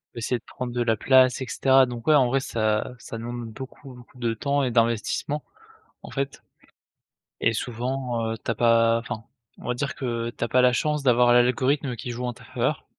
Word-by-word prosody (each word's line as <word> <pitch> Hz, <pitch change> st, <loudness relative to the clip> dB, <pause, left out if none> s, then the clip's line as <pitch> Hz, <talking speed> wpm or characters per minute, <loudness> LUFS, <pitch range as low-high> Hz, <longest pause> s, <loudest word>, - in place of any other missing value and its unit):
Essayer 120 Hz, +1 st, -1 dB
de -, -, -33 dB
prendre 125 Hz, -1 st, -6 dB
de 120 Hz, -, -1 dB
la 115 Hz, -2 st, +1 dB
place 130 Hz, +2 st, +4 dB
et 130 Hz, -, -2 dB
cetera, 135 Hz, +3 st, +4 dB
donc 120 Hz, 0 st, -8 dB
ouais 155 Hz, -, +6 dB
en 130 Hz, -3 st, +5 dB
vrai 135 Hz, +3 st, +1 dB
ça 110 Hz, -1 st, -1 dB
ça 115 Hz, -1 st, -8 dB
demande 120 Hz, 0 st, -6 dB
beaucoup, 135 Hz, +2 st, -10 dB
beaucoup 125 Hz, +1 st, -16 dB
de 115 Hz, -2 st, -1 dB
temps 140 Hz, +5 st, 0 dB
et 125 Hz, -, 0 dB
d'investissement 115 Hz, +5 st, 0 dB, 0.6 s
en -, -, -10 dB
fait, 140 Hz, -1 st, -4 dB, 1.0 s
et 115 Hz, -, +3 dB
souvent, 120 Hz, 0 st, -2 dB
heu, -, -, -4 dB
tu -, -, -11 dB
as 115 Hz, -, +1 dB
pas 115 Hz, 0 st, +4 dB
enfin, 115 Hz, -1 st, -6 dB, 0.3 s
on -, -, -10 dB
va 125 Hz, -, +1 dB
dire 140 Hz, +3 st, -3 dB
que 120 Hz, -3 st, -2 dB
tu 120 Hz, -, -4 dB
as 115 Hz, -, -2 dB
pas 125 Hz, +2 st, +3 dB
la 125 Hz, -, +5 dB
chance 150 Hz, +3 st, 0 dB
d'avoir 125 Hz, -2 st, +4 dB
l'a 120 Hz, 0 st, +7 dB
l'algorithme 130 Hz, +1 st, 0 dB
qui 120 Hz, +2 st, -5 dB
joue 125 Hz, +1 st, -5 dB
en 125 Hz, -, -1 dB
ta 120 Hz, 0 st, -16 dB
faveur. -, -, -2 dB
120 Hz, 215 wpm, -25 LUFS, 115-130 Hz, 1.0 s, l'a